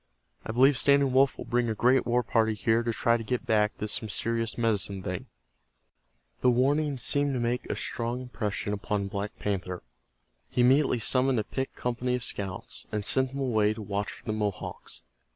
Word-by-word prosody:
I -, -, -4 dB
believe 130 Hz, +3 st, +4 dB
Standing 140 Hz, -1 st, +4 dB
Wolf 135 Hz, +1 st, +4 dB
will -, -, -6 dB
bring 120 Hz, 0 st, +1 dB
a 110 Hz, -, -1 dB
great 125 Hz, +4 st, +3 dB
war 120 Hz, +1 st, +2 dB
party 110 Hz, -2 st, +1 dB
here 110 Hz, +3 st, +2 dB
to 120 Hz, 0 st, -1 dB
try 115 Hz, +1 st, +2 dB
to 115 Hz, -, -6 dB
get 125 Hz, +3 st, -2 dB
back 105 Hz, -1 st, +2 dB
this 105 Hz, 0 st, -3 dB
mysterious 115 Hz, +2 st, -2 dB
Medicine 100 Hz, -4 st, 0 dB
Thing." 90 Hz, -1 st, -4 dB, 1.1 s
The 125 Hz, -, +4 dB
warning 140 Hz, +4 st, +2 dB
seemed 140 Hz, +3 st, 0 dB
to -, -, -1 dB
make 120 Hz, +1 st, -1 dB
a -, -, -1 dB
strong 120 Hz, +1 st, -3 dB
impression 105 Hz, -5 st, -3 dB
upon 100 Hz, 0 st, -2 dB
Black 100 Hz, +1 st, -4 dB
Panther. 90 Hz, -4 st, -3 dB, 0.7 s
He 125 Hz, -, +1 dB
immediately 130 Hz, +1 st, +4 dB
summoned 130 Hz, +2 st, +2 dB
a -, -, 0 dB
picked 130 Hz, +5 st, -4 dB
company 125 Hz, +1 st, -1 dB
of 125 Hz, -, -3 dB
scouts, 95 Hz, -5 st, -4 dB
and 105 Hz, -2 st, -1 dB
sent 130 Hz, +4 st, +2 dB
them 140 Hz, -, -3 dB
away 110 Hz, -5 st, +2 dB
to 110 Hz, -, -7 dB
watch 100 Hz, 0 st, -2 dB
for -, -, -13 dB
the 110 Hz, -, -1 dB
Mohawks. 105 Hz, -3 st, -4 dB
115 Hz, 190 wpm, -28 LUFS, 105-125 Hz, 1.1 s, believe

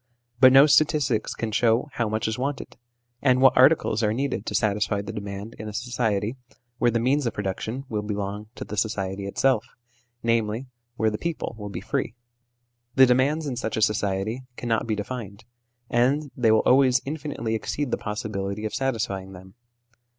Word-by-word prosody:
But 130 Hz, 0 st, +8 dB
no 135 Hz, +2 st, +8 dB
statistics 145 Hz, -6 st, +2 dB
can 115 Hz, -1 st, -3 dB
show 115 Hz, +4 st, +2 dB
how 120 Hz, -3 st, -1 dB
much 110 Hz, +1 st, -1 dB
is 110 Hz, +2 st, -2 dB
wanted, 135 Hz, +1 st, -4 dB, 0.5 s
and 130 Hz, -2 st, +4 dB
what 130 Hz, 0 st, +6 dB
articles 130 Hz, -4 st, +4 dB
are 105 Hz, -2 st, +2 dB
needed 130 Hz, -5 st, -2 dB
to -, -, -2 dB
satisfy 105 Hz, -1 st, +1 dB
the 110 Hz, +2 st, -6 dB
demand 100 Hz, +1 st, -6 dB
in 110 Hz, -, -6 dB
a -, -, -8 dB
society 115 Hz, -1 st, -1 dB, 0.4 s
where 120 Hz, -, +4 dB
the 115 Hz, 0 st, +1 dB
means 130 Hz, +3 st, +1 dB
of 115 Hz, -, -3 dB
production 105 Hz, +6 st, -3 dB
will 105 Hz, -3 st, -2 dB
belong 105 Hz, 0 st, -4 dB
to -, -, -6 dB
the 105 Hz, -, -7 dB
society 100 Hz, -3 st, -2 dB
itself, 125 Hz, +2 st, +2 dB, 0.6 s
i.e. 115 Hz, +1 st, 0 dB, 0.3 s
where 110 Hz, -1 st, +2 dB
the 105 Hz, -, -4 dB
people 170 Hz, -7 st, -3 dB
will 105 Hz, -2 st, -7 dB
be 95 Hz, -3 st, -6 dB
free. 110 Hz, +1 st, -2 dB, 0.8 s
The 130 Hz, -, +8 dB
demands 135 Hz, +5 st, +2 dB
in 135 Hz, -3 st, -3 dB
such 110 Hz, -3 st, -3 dB
a -, -, 0 dB
society 105 Hz, +2 st, 0 dB, 0.2 s
cannot 115 Hz, -1 st, -1 dB
be 110 Hz, -, 0 dB
defined, 105 Hz, -1 st, -6 dB, 0.4 s
and 135 Hz, +5 st, +1 dB
they 115 Hz, -3 st, +3 dB
will 110 Hz, -, +4 dB
always 130 Hz, -1 st, +5 dB
infinitely 145 Hz, -6 st, -4 dB
exceed 125 Hz, +4 st, -2 dB
the -, -, +1 dB
possibility 105 Hz, -1 st, -4 dB
of 110 Hz, -, -3 dB
satisfying 105 Hz, -7 st, -2 dB
them. 95 Hz, +1 st, -13 dB
110 Hz, 175 wpm, -25 LUFS, 105-130 Hz, 0.8 s, But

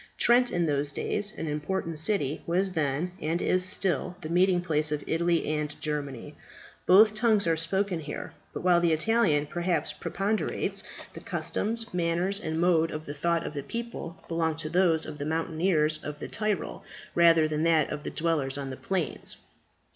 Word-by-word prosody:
Trent, 245 Hz, +1 st, +4 dB
in 175 Hz, -1 st, 0 dB
those 145 Hz, -1 st, 0 dB
days 205 Hz, +7 st, -2 dB
an -, -, -4 dB
important 160 Hz, +2 st, -2 dB
city, 160 Hz, -5 st, +1 dB
was 185 Hz, +3 st, +1 dB
then, 155 Hz, +1 st, -1 dB
and 165 Hz, +3 st, -1 dB
is 185 Hz, +1 st, +3 dB
still, 180 Hz, -2 st, +3 dB
the 155 Hz, -, -6 dB
meeting 180 Hz, +1 st, +3 dB
place 155 Hz, -3 st, 0 dB
of 150 Hz, -1 st, -2 dB
Italy 170 Hz, +1 st, +1 dB
and 150 Hz, -1 st, -3 dB
Germany. 145 Hz, -5 st, -4 dB, 0.5 s
Both 215 Hz, +4 st, +7 dB
tongues 215 Hz, -2 st, +2 dB
are 165 Hz, -, +2 dB
here 165 Hz, -, +1 dB
spoken; 165 Hz, -2 st, -2 dB, 0.2 s
but -, -, -6 dB
while 175 Hz, -1 st, +4 dB
the 170 Hz, -2 st, +3 dB
Italian 160 Hz, -4 st, +2 dB
perhaps 170 Hz, -1 st, -1 dB
preponderates, 200 Hz, +7 st, -1 dB, 0.3 s
the -, -, -8 dB
customs, 225 Hz, 0 st, -3 dB
manners, 175 Hz, +3 st, 0 dB
and 160 Hz, -5 st, -3 dB
mode 165 Hz, -2 st, +3 dB
of 155 Hz, +1 st, -6 dB
thought 170 Hz, +3 st, 0 dB
of -, -, -5 dB
the 145 Hz, -, -4 dB
people 230 Hz, -3 st, -6 dB
belong 165 Hz, -1 st, 0 dB
to 155 Hz, 0 st, -4 dB
those 170 Hz, -2 st, +2 dB
of 150 Hz, -2 st, -8 dB
the 145 Hz, -, -3 dB
mountaineers 160 Hz, -1 st, +1 dB
of 150 Hz, 0 st, -6 dB
the -, -, -6 dB
Tyrol, 215 Hz, -2 st, -3 dB, 0.3 s
rather 165 Hz, -2 st, +5 dB
than 155 Hz, +1 st, 0 dB, 0.2 s
of 150 Hz, -, -4 dB
the -, -, -5 dB
dwellers 150 Hz, -5 st, -1 dB
on 135 Hz, -1 st, -5 dB
the 130 Hz, -, -7 dB
plains. 190 Hz, -4 st, -3 dB
165 Hz, 170 wpm, -27 LUFS, 150-185 Hz, 0.5 s, Both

